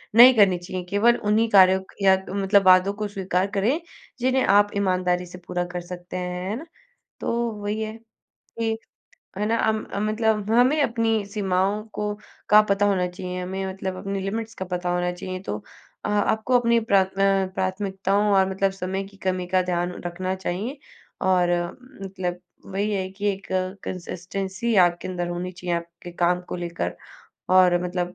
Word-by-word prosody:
नहीं 250 +3 +10
करनी 195 -4 +5
चाहिए। 180 +1 -6
केवल 225 +5 +4
उन्हीं 215 +2 +3
कार्यों 190 -2 +6
क - - -25
या 190 -1 +6
मतलब 195 +1 +2
वादों 185 +1 +6
को 210 0 -3
स्वीकार 190 -1 -1
करें, 220 +9 +1 0.4
जिन्हें 260 +1 +2
आप 205 +1 +4
ईमानदारी 180 -2 +1
से 180 +1 -11
पूरा 180 - -1
कर 180 - -4
सकते 175 +1 -7
हैं 180 +1 -4
है 210 - -1
ना? 285 +7 -7 0.6
तो 235 0 -1
वही 210 +1 -2
है 215 0 -3 0.7
कि 225 -1 0 0.6
है 210 - 0
ना 230 +1 +1
अम, 220 -1 0 0.2
मतलब 215 -1 0
हमें 255 +6 +4
अपनी 225 -3 +1
सीमाओं 200 0 0
को 210 0 -2 0.4
का 210 0 +8
पता 200 +1 +3
होना 185 -3 +2
चाहिए 180 0 -6
हमें 190 +1 -4
मतलब 190 -1 -4
अपनी 195 +1 -3
लिमिट्स 225 +3 -4
का 190 - -5
पता 180 -1 -3
होना 180 0 0
चाहिए। 185 +1 -6
तो 105 - -4 0.5
अ, - - -1
आपको 220 +4 +2
अपनी 235 -1 +3
प्राथ 200 -4 +3
अ, 195 -1 +3
प्राथमिकताओं 195 +2 0
और 190 0 +4
मतलब 195 0 +1
समय 190 +2 -2
की 195 0 -14
कमी 185 -1 -1
का 185 - +5
ध्यान 175 0 -1
रखना 185 +2 -2
चाहिए 200 +9 -4 0.5
और 180 -2 +3 0.5
मतलब 185 -2 -4 0.3
वही 205 +2 -1
है 190 -1 -2
कि 200 +1 -6
एक 195 0 -9 0.4
कंसिस्टेंसी 190 +5 -3
आपके 175 0 0
अंदर 175 -1 -3
होनी 175 +1 -4
चाहिए, 180 -1 -3
आपके 170 +1 -7
काम 175 +1 +1
को - - -3
लेकर 175 -1 -4 0.6
और 180 -1 +5
मतलब 180 0 -3
190 Hz, 170 wpm, -24 LUFS, 180-210 Hz, 0.7 s, नहीं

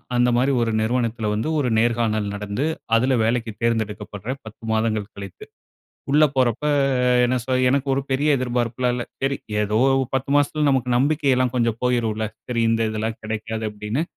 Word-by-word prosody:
அந்த 120 0 +3
மாரி 130 +3 +2
ஒரு 115 -1 0
நிறுவனத்தில 115 -1 -1
வந்து 110 +8 -1
ஒரு 130 -4 0
நேர்காணல் 115 -2 +1
நடந்து, 100 +6 -3 0.3
அதுல 130 +3 +3
வேலைக்கு 115 0 0
தேர்ந்தெடுக்கப்படுறேன், 110 +1 -2
10 110 +1 -12
மாதங்கள் 110 -2 -1
கழித்து. 100 -2 -9 0.7
உள்ள 150 +2 +5
போறப்ப 130 +1 +1 0.6
என்ன 125 +1 +1
சொ 130 - -3 0.2
எனக்கு 140 +2 +1
ஒரு 135 - 0
பெரிய 145 +3 +2
எதிர்பார்ப்புல்லாம் 125 -1 -1
இல்ல. 125 - -2 0.2
சரி 135 0 +1 0.2
ஏதோ 105 +1 +1 0.4
10 135 +1 -1
மாசத்தில 145 +1 +2
நமக்கு 130 -3 +1
நம்பிக்கையல்லாம் 135 -2 +2
கொஞ்சம் 115 -2 0
போயிரும்ல. 115 -3 0 0.2
"சரி 120 -2 -1
இந்த 115 0 +1
இதெல்லாம் 110 +1 -3
கெடைக்காது." 110 +1 -4
அப்டீன்னு. 105 +7 -3
120 Hz, 150 wpm, -22 LUFS, 110-130 Hz, 0.7 s, உள்ள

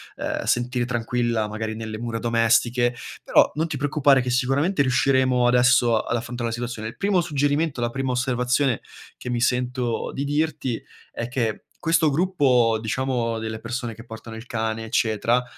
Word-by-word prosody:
uhm, - - -3
sentire 120 0 0
tranquilla 120 -2 -1
magari 110 +1 -4
nelle 110 -1 -5
mura 115 -1 -3
domestiche. 120 +1 +2 0.3
Però, - - +4
non 160 +2 0
ti 160 - -4
preoccupare 140 -1 +3
che 125 - -3
sicuramente 135 +7 +1
riusciremo 130 -1 +3
adesso 125 -1 +4
ad - - -2
affrontare 120 0 -3
la 115 - -3
situazione. 120 -2 -5
Il 115 - -8
primo 200 -2 +1
suggerimento, 145 -3 0
la 120 - 0
prima 135 +1 -2
osservazione, 125 0 +1 0.4
che - - -7
mi 120 -1 -1
sento 125 -1 0
di 135 - -3
dirti 145 -4 -1 0.3
è 115 - -4
che 120 -4 -2 0.2
questo 165 -1 +3
gruppo 135 -9 +2
diciamo 115 0 -1
delle 110 0 -5
persone 120 0 -4
che 115 - -12
portano 110 0 -9
il 115 +2 -9
cane 110 -1 -2
eccetera, 115 +2 +1
125 Hz, 160 wpm, -23 LUFS, 115-135 Hz, 0.4 s, Però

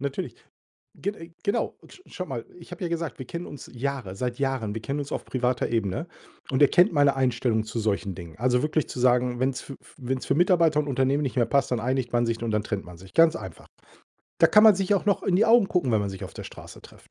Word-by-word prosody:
Natürlich. 140 -1 -4 0.6
Gen 200 +2 -3
äh, 165 -2 -11
genau, 200 - -1
sch 370 - -16
schau - - -6
mal, - - -5
ich - - -14
habe - - -9
ja - - 0
gesagt, 165 -4 -3
wir 130 - -6
kennen 170 +5 -6
uns 145 - -10
Jahre 125 -6 -4
seit 125 +3 -3
Jahren. 130 -6 -1
Wir 110 - -5
kennen 140 +4 -3
uns 140 - -5
auf - - -3
privater 125 -1 -1
Ebene 115 - -1 0.4
und 130 - +1
er 145 - +8
kennt 175 -1 +4
meine 145 -2 +4
Einstellung 120 -4 +1
zu 115 - -4
solchen 100 -3 -1
Dingen. 85 -3 -10
Also, 125 +1 +2
wirklich 155 +1 0
zu 125 - -6
sagen, 125 0 +2
wenn's 130 0 0
f 135 - -9
f - - -20
wenn's 130 -1 -3
für - - +1
Mitarbeiter 170 -3 +4
und 150 - -1
Unternehmen 135 +2 +1
nicht 135 - -3
mehr 120 -2 +3
passt, 140 -3 +1
dann 120 - +1
einigt 130 0 -1
man 120 0 +2
sich 115 0 -2
und 115 -2 -2
dann 105 -1 0
trennt 100 -3 -4
man 90 -1 -11
sich, 95 +2 -15
ganz 165 0 +5
einfach. - - -9 0.7
Da - - +7
kann 210 0 +6
man 215 -3 +9
sich 195 +1 +1
auch 195 - 0
noch 200 - +2
in 190 - +1
die 215 - +4
Augen 230 -3 +6
gucken, 175 -9 +1
wenn 110 - +3
man 100 -1 -2
sich 95 - -8
auf - - -8
der - - -8
Straße - - -11
trifft. - - -17
130 Hz, 260 wpm, -26 LUFS, 115-155 Hz, 0.7 s, man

